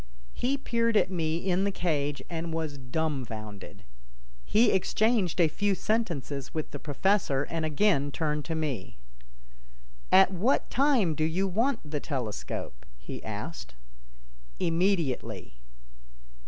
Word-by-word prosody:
He 265 Hz, +3 st, 0 dB
peered 230 Hz, -4 st, +1 dB
at 190 Hz, -, +2 dB
me 165 Hz, -3 st, 0 dB
in 185 Hz, +1 st, +1 dB
the 200 Hz, -, +2 dB
cage 150 Hz, -6 st, -1 dB
and 165 Hz, -1 st, -4 dB
was 160 Hz, -3 st, -3 dB
dumfounded. 125 Hz, -7 st, -4 dB, 0.6 s
He 225 Hz, -, +4 dB
exchanged 200 Hz, -1 st, +2 dB
a 170 Hz, -, +6 dB
few 200 Hz, +5 st, 0 dB
sentences 160 Hz, -, -2 dB
with 155 Hz, -, -3 dB
the -, -, -6 dB
professor 150 Hz, -2 st, +1 dB
and 165 Hz, -1 st, -1 dB
again 150 Hz, -3 st, +2 dB
turned 150 Hz, 0 st, -1 dB
to 165 Hz, -, -2 dB
me: 145 Hz, -11 st, -3 dB, 1.1 s
"At 190 Hz, 0 st, +7 dB
what 210 Hz, +9 st, +1 dB
time 255 Hz, -, +3 dB
do 155 Hz, -, -1 dB
you 175 Hz, +5 st, +1 dB
want 230 Hz, +8 st, +1 dB
the 150 Hz, 0 st, -2 dB
telescope?" 110 Hz, -, -4 dB
he -, -, -8 dB
asked. 60 Hz, -1 st, -6 dB, 0.8 s
"Immediately." 165 Hz, -, 0 dB
165 Hz, 125 wpm, -29 LUFS, 145-195 Hz, 1.1 s, At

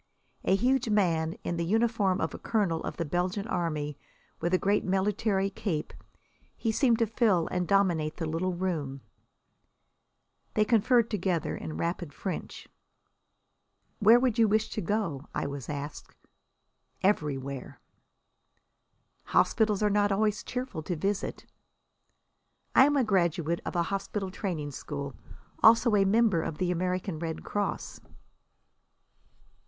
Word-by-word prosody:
A 190 Hz, -, +4 dB
huge 250 Hz, +3 st, +1 dB
man, 165 Hz, -6 st, +2 dB
in 170 Hz, -, -2 dB
the 170 Hz, -, 0 dB
uniform 210 Hz, -1 st, +1 dB
of -, -, -1 dB
a -, -, -7 dB
colonel 195 Hz, -8 st, 0 dB
of -, -, -5 dB
the 170 Hz, -, -1 dB
Belgian 180 Hz, +6 st, -1 dB
Army, 155 Hz, -, -2 dB, 0.4 s
with 170 Hz, +1 st, -1 dB
a 185 Hz, -, +4 dB
great 200 Hz, +3 st, +1 dB
military 195 Hz, +1 st, 0 dB
cape, 175 Hz, -6 st, -3 dB, 0.6 s
he 225 Hz, -, 0 dB
seemed 235 Hz, 0 st, +3 dB
to 230 Hz, -, +2 dB
fill 210 Hz, -6 st, +2 dB
and 180 Hz, -1 st, -1 dB
dominate 175 Hz, -6 st, +2 dB
the 165 Hz, -, -2 dB
little 170 Hz, +3 st, -1 dB
room. 155 Hz, -7 st, -3 dB, 1.5 s
They 215 Hz, -, +4 dB
conferred 235 Hz, +1 st, +3 dB
together 180 Hz, -5 st, -1 dB
in 155 Hz, -, -6 dB
rapid 170 Hz, -2 st, -3 dB
French. 190 Hz, -, -5 dB, 1.3 s
"Where 225 Hz, +3 st, +7 dB
do 245 Hz, -2 st, +2 dB
you 225 Hz, -, +6 dB
wish 215 Hz, +1 st, +1 dB
to 215 Hz, -, -3 dB
go?" 170 Hz, -8 st, -2 dB
I -, -, -1 dB
was 140 Hz, -3 st, -6 dB
asked. 145 Hz, 0 st, -6 dB, 0.9 s
"Everywhere." 140 Hz, -8 st, -1 dB, 1.5 s
"Hospitals 215 Hz, -3 st, +2 dB
are 210 Hz, -, +3 dB
not 205 Hz, 0 st, +2 dB
always 210 Hz, +1 st, +1 dB
cheerful 250 Hz, -9 st, -4 dB
to 175 Hz, +3 st, -3 dB
visit." 195 Hz, +5 st, -2 dB, 1.3 s
"I 265 Hz, -, +7 dB
am 290 Hz, 0 st, +2 dB
a 265 Hz, -, +4 dB
graduate 170 Hz, -5 st, +1 dB
of -, -, -4 dB
a 170 Hz, -, +2 dB
hospital 195 Hz, +1 st, -3 dB
training 170 Hz, -8 st, -3 dB
school. 140 Hz, 0 st, -6 dB, 0.5 s
Also 230 Hz, 0 st, +6 dB
a 195 Hz, -1 st, +4 dB
member 210 Hz, -4 st, +3 dB
of 160 Hz, -, -4 dB
the 180 Hz, +1 st, 0 dB
American 180 Hz, -1 st, -2 dB
Red 165 Hz, -1 st, -4 dB
Cross." 205 Hz, -1 st, -3 dB
190 Hz, 135 wpm, -29 LUFS, 165-215 Hz, 1.5 s, Where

